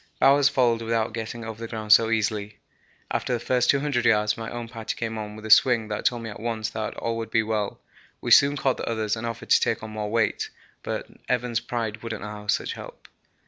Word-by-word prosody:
Bowers 140 0 +6
followed 120 -4 +2
without 115 -1 -1
getting 115 0 -5
over 110 0 -7
the 115 - -4
ground 110 -2 +2
so 115 -1 +6
easily. 105 -2 -1 0.5
After 125 - -1
the 120 - 0
first 125 +1 +1
200 140 -3 +2
yards 105 -2 +3
my 115 0 -6
own 120 -1 -5
party 115 -2 -5
came 115 -1 -3
on 105 0 -6
with 110 0 -10
a 110 - -2
swing 115 -2 +5
that 105 - -4
told 120 -2 +1
me 115 - -5
at - - -9
once 115 -1 -2
that 110 -1 -4
all 115 0 -2
would 115 0 -4
be 115 - +2
well. 105 -2 -2 0.4
We - - -4
soon 140 +1 +7
caught 135 -2 +1
the - - -4
others 110 -2 0
and 115 +1 -4
offered 115 0 -6
to - - +7
take 115 - 0
on 110 - -6
more 105 -1 -4
weight, 115 -1 0 0.3
but - - -4 0.2
Evans' 125 -2 0
pride 115 -3 -4
wouldn't 115 -3 -5
allow 105 0 -7
such 100 - 0
help. - - -11
115 Hz, 225 wpm, -25 LUFS, 110-120 Hz, 0.5 s, soon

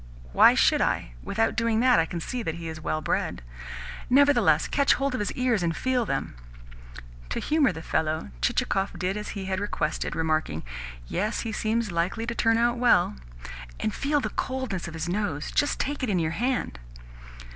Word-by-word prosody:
"Why - - +7
should - - +4
I? - - 0
Without 225 +3 0
doing 230 -2 +1
that, 250 -1 +5
I 165 - +2
can 170 - -4
see 245 +9 -4
that 165 -7 -3
he 170 -1 -6
is 160 -1 -6
well 155 0 -2
bred." - - -2 0.7
"Nevertheless, 285 +3 +4
catch 280 -1 +3
hold 275 0 -1
of 255 - -2
his 205 - -1
ears 250 -5 +1
and 165 -1 -1
feel 255 -3 0
them." 135 - -2 1.0
To - - -2
humour 295 -6 +2
the 160 -2 -8
fellow 155 - -1
Chichikov 195 - 0
did 185 +2 -1
as 210 0 -5
he 195 - -4
had 190 0 -1
requested, 200 -6 -2
remarking: 155 - -1 0.4
"Yes, 210 - -1
he 225 - -4
seems 220 -1 -1
likely 175 +7 -1
to 235 - -2
turn 225 -1 +2
out 240 +1 +2
well." 235 - +4 0.6
"And 215 - -1
feel 290 +1 +1
the - - -2
coldness 260 -10 -3
of 165 - -7
his 160 +1 -3
nose! 175 -6 -2
Just 290 - +1
take 290 +1 -2
it 255 - -1
in 195 - +1
your 160 -2 0
hand." 240 - -1
210 Hz, 190 wpm, -26 LUFS, 165-245 Hz, 1.0 s, Why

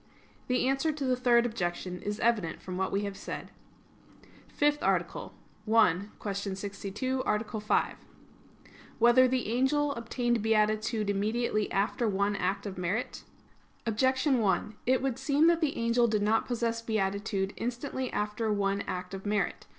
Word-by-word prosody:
The 250 0 +1
answer 275 +4 +1
to 295 -2 -4
the 255 -1 +2
Third 240 -1 +4
Objection 180 -5 -3
is 205 +1 -3
evident 220 -8 +1
from 185 - -7
what 190 +1 -1
we 200 - 0
have 200 -1 -4
said. - - -7 1.0
_______________________ - - -23
FIFTH 295 0 +2
ARTICLE - - -1 0.4
[I, 195 -6 +5 0.2
Q. 205 - -3 0.2
62, 205 +6 -3
Art. 215 0 -2
5] 210 - +1 1.0
Whether 240 +2 +6
the 255 -3 -1
Angel 285 +4 +2
Obtained 240 -1 -1
Beatitude 215 0 +1
Immediately 215 +2 0
After 210 +4 0
One 200 +1 +1
Act 195 +1 -1
of 190 -3 -5
Merit? 185 +7 -2 0.6
Objection 260 +4 +2
1: 210 0 0
It 260 +1 +3
would 265 -2 -1
seem 280 +3 +3
that 340 0 +4
the 300 -3 0
angel 235 +1 +3
did 215 -2 +1
not 220 +2 +2
possess 230 -1 -1
beatitude 200 -2 -1
instantly 250 +2 -3
after 210 +2 -1
one 200 -1 0
act 180 +1 -4
of 195 +1 -6
merit. 205 -3 -1
225 Hz, 150 wpm, -29 LUFS, 200-250 Hz, 1.0 s, Whether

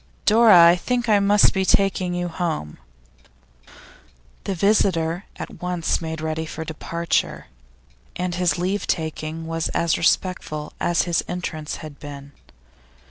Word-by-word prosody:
'Dora, 215 -5 +7
I 170 - +5
think 240 +6 -2
I 210 -2 +4
must 200 +1 +4
be 190 - 0
taking 185 -1 +1
you 175 0 -2
home.' 160 - -4 1.7
The 195 - -2
visitor 180 -3 +1
at - - -9
once 180 -2 -1
made 160 -1 -5
ready 160 0 -3
for 160 +1 -6
departure, 170 +1 -2 0.7
and 180 0 -2
his 175 -3 +1
leave 185 +3 -2
taking 160 0 -3
was 165 0 -2
as 165 -1 +1
respectful 165 -3 -1
as 175 - +1
his 175 -1 0
entrance 160 -4 -4
had 145 -2 -11
been. 140 -1 -9
170 Hz, 135 wpm, -22 LUFS, 160-185 Hz, 1.7 s, Dora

